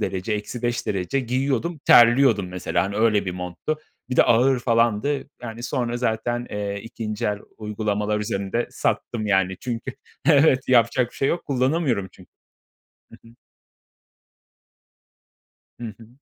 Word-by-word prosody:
derece, 95 +3 -2
-5 120 +3 -3
derece; 100 +7 -1
giyiyordum, 135 +6 -1
terliyordum 120 -4 +6
mesela, 90 +1 -1
hani, 100 +1 -4
öyle 110 -2 +3
bir 90 - -3
monttu. 90 - -4 0.3
Bir 125 - -3
de - - +8
ağır 125 +3 +3
falandı. 120 +4 +1
Yani, 115 0 -7
sonra 120 -1 -2
zaten, 120 0 -1
eee, 100 -1 -3
2'nci 110 0 -4
el 105 -1 -1 0.2
uygulamalar 105 0 -2
üzerinde 100 +3 -2
sattım 110 -3 -2
yani 95 -2 +1
çünkü 125 +1 -4 0.3
Evet, 140 -4 +4
yapacak 120 0 +3
bir - - -21
şey 135 - +1
yok, 175 - -1
kullanamıyorum 130 - 0
çü - - -18 0.9
Hı - - -16
hı. 115 - -16 2.5
Hı 120 - -5
hı. 115 - -15
115 Hz, 135 wpm, -23 LUFS, 105-125 Hz, 2.5 s, de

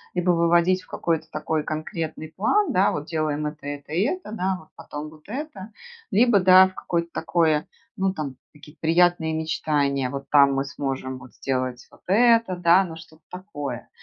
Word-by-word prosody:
либо 180 0 +2
выводить 170 +2 +3
в - - -21
какой-то 160 -2 -2
такой 155 0 -2
конкретный 155 0 -5
план, 320 - +2
да, 190 +2 +3
вот 150 0 -4
делаем 155 -2 -2
это, 150 -1 -6
это 145 +1 -7
и 175 - +1
это, 360 - -3
да, 190 -3 -1
а 185 - -5
вот 155 - -20
потом 150 +1 -7
вот 155 -1 -18
это, 225 -4 -6 0.4
либо, 230 -1 +4
да, 185 0 +7
в 185 - -18
какое-то 170 -2 -2
такое, 160 -2 +1 0.3
ну 190 0 0
там 150 -7 -5 0.2
какие-то 150 +1 -16
приятные 165 0 +3
мечтания: 145 -4 0
вот 140 +1 -6
там 140 -2 +6
мы 135 - 0
сможем 135 -2 -4
вот 130 -1 -14
сделать 130 -2 -3
вот - - -20
это, 230 -1 +4
да, 175 +2 +5
но 165 -3 -7
что-то 160 -1 -15
такое. 145 - -6
160 Hz, 180 wpm, -24 LUFS, 150-185 Hz, 0.4 s, да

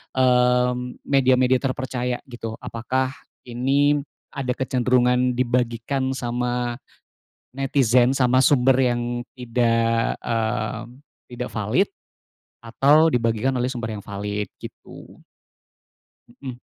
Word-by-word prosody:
mmm, 125 -1 +2
media-media 130 -2 +3
terpercaya, 125 -2 -3
gitu, 115 -2 -6
apakah 130 +3 -2 0.3
ini 140 +4 +1 0.3
ada 130 -3 -2
kecenderungan 125 -1 +1
dibagikan 125 +2 -1
sama 120 0 -2 0.8
netizen, 130 -2 +3
sama 130 -1 +2
sumber 135 -2 +4
yang 125 -2 +1 0.3
tidak, 115 -2 +1
mmm, 115 +2 -3 0.3
tidak 125 0 -5
valid, 110 - 0 0.7
atau 145 +7 +4
dibagikan 115 +2 +1
oleh 125 0 -1
sumber 115 -4 -4
yang 100 - -7
valid, 100 +1 -4
gitu. - - -12 1.2
Mhm. 130 -3 -7
125 Hz, 95 wpm, -23 LUFS, 120-130 Hz, 1.2 s, sumber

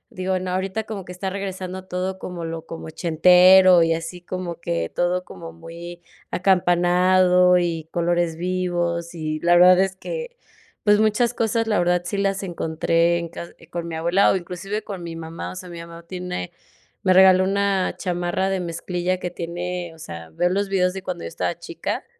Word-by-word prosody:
digo: 185 0 -1
“No, 185 0 -4
ahorita 190 +4 -2
como 200 -4 -6
que - - -9
está 190 +2 -4
regresando 190 -1 -5
todo 185 +1 -3
como 175 -3 -6
lo 165 0 -6
como 165 - -7
ochentero 180 +2 +6
y 165 0 +2
así 165 +2 -6
como 175 -1 -5
que 85 - -2
todo 180 +1 0
como 165 -1 -10
muy 170 +1 -10 0.3
acampanado 180 0 +4
y 165 -2 -2
colores 170 -1 0
vivos”. 175 -1 -2
Y 155 -1 -3
la 175 0 +4
verdad 180 +1 +7
es 190 0 0
que, 485 - -6 0.5
pues 210 -1 +4
muchas 220 +3 +2
cosas, 230 0 0
la 210 -4 +2
verdad, 175 0 +2
sí 200 - -3
las 195 0 0
encontré 170 -1 +1
en 170 - -4
ca 170 +1 -8 0.2
con 170 -1 -4
mi 165 - -5
abuela 170 +5 +3
o - - +1
inclusive 185 +4 -5
con 195 -3 -7
mi 165 -1 -6
mamá. 165 0 -6
O - - -9
sea, 185 0 -8
mi 170 -1 -8
mamá 170 0 -10
tiene 180 - -5 0.5
me 185 - +4
regaló 185 0 +7
una 195 -1 0
chamarra 175 +1 -1
de 190 - 0
mezclilla 175 +1 -2
que 180 -1 -4
tiene 175 0 -5
o - - -19
sea, 85 - -9
veo 175 - +1
los 200 +2 -1
videos 180 -2 +1
de 190 - -6
cuando 180 -2 -5
yo - - -4
estaba - - -3
chica - - -5
180 Hz, 185 wpm, -22 LUFS, 170-190 Hz, 0.5 s, verdad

